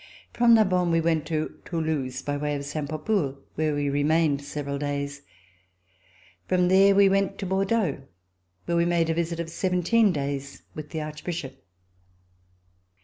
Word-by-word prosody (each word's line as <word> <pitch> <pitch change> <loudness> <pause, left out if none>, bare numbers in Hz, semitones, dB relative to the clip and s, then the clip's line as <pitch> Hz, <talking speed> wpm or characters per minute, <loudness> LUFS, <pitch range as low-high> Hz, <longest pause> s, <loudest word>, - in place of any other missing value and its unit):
From 235 -1 +5
Narbonne, 185 -5 +3
we 165 0 +3
went 165 -2 0
to 155 -1 -3
Toulouse, 155 -6 -3
by 145 - -2
way 145 0 -2
of 140 0 -5
Saint 145 0 -4
Papoul, 155 -3 -1 0.2
where 155 -1 0
we 145 0 -1
remained 145 +1 +2
several 140 0 -4
days. 140 -1 -3 1.3
From 180 -1 +2
there 195 +1 +6
we 200 0 +6
went 195 0 +1
to 195 - -4
Bordeaux, 195 -4 0 0.6
where 170 - 0
we 170 - +3
made 170 -1 +1
a - - +1
visit 170 0 -2
of 165 -1 -4
seventeen 185 +5 +2
days 140 -2 -4
with 155 -1 -8
the 160 - -4
Archbishop. 150 - -6
160 Hz, 150 wpm, -26 LUFS, 145-180 Hz, 1.3 s, there